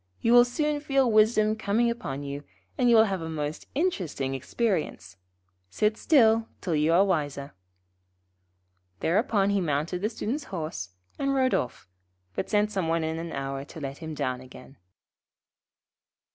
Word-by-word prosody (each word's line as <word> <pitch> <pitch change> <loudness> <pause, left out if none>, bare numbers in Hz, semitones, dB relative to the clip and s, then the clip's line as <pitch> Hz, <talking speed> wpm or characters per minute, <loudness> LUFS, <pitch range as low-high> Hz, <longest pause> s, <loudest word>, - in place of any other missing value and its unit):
You 230 - +2
will 245 0 +8
soon 295 +4 -1
feel 270 -4 +2
wisdom 215 0 +4
coming 220 +2 +1
upon 145 - -5
you, 140 +1 -5 0.3
and 250 -2 +2
will 225 -2 +7
have 195 -5 -2
a 160 - -5
most 150 -1 -4
interesting 180 - -1
experience. 150 - -2 0.5
Sit 210 - +1
still 225 -5 +4
till 175 - -2
you 155 +1 +2
are 180 +4 +5
wiser.' 145 -6 -2 1.5
Thereupon 200 - +2
he 200 -1 +1
mounted 160 +3 -1
the 210 - 0
Student's 245 +6 -3
horse, 155 - -5 0.3
and 275 0 0
rode 260 -1 +2
off, 120 -6 -2 0.5
but - - -3
sent 210 0 +2
some 190 -5 -1
one 165 0 +1
in 160 +1 -2
an 165 0 -5
hour 135 0 -4
to 160 - -10
let 140 -1 -6
him 160 -2 -6
down 130 -3 -2
again. 130 +1 -14
185 Hz, 155 wpm, -27 LUFS, 145-230 Hz, 1.5 s, will